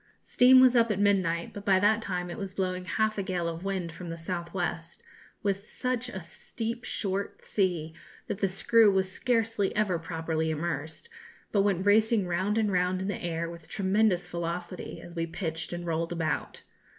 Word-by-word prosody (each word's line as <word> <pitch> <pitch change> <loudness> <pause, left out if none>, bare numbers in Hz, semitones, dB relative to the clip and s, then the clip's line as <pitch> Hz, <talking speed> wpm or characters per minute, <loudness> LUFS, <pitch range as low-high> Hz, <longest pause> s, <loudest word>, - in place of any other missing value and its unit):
Steam 255 +1 +6
was 255 -1 +6
up 230 -1 +5
at 210 - 0
midnight, 185 -5 +1
but 205 - -7
by 195 -3 +4
that 215 +3 +3
time 180 -4 -3
it - - -6
was 195 -1 -5
blowing 185 -1 -2
half 215 +2 0
a - - +1
gale 185 -3 -2
of 165 +1 -4
wind 190 -4 -2
from 175 +2 -8
the 165 - -5
south 170 0 -4
west, 170 -2 -4 0.4
with 200 0 -1
such 250 -1 -2
a 190 - -5
steep 225 +7 -6
short 195 -1 -3
sea 175 -6 0 0.3
that 195 - -4
the 195 - +2
screw 210 +3 +4
was 190 -1 +1
scarcely 225 -3 0
ever 200 -5 +1
properly 160 -1 -2
immersed, 160 - -3 0.4
but 200 - +3
went 195 -2 +1
racing 215 0 +4
round 185 +5 0
and 215 -2 +2
round 180 0 +1
in 190 +2 -2
the 200 - -4
air 170 -1 -2
with 170 -2 -10
tremendous 195 -2 +2
velocity, 175 +1 -5
as 175 - -11
we 165 -1 -2
pitched 165 -1 -4
and 175 0 -5
rolled 165 0 -1
about. 165 -2 -2
185 Hz, 185 wpm, -28 LUFS, 170-205 Hz, 0.4 s, Steam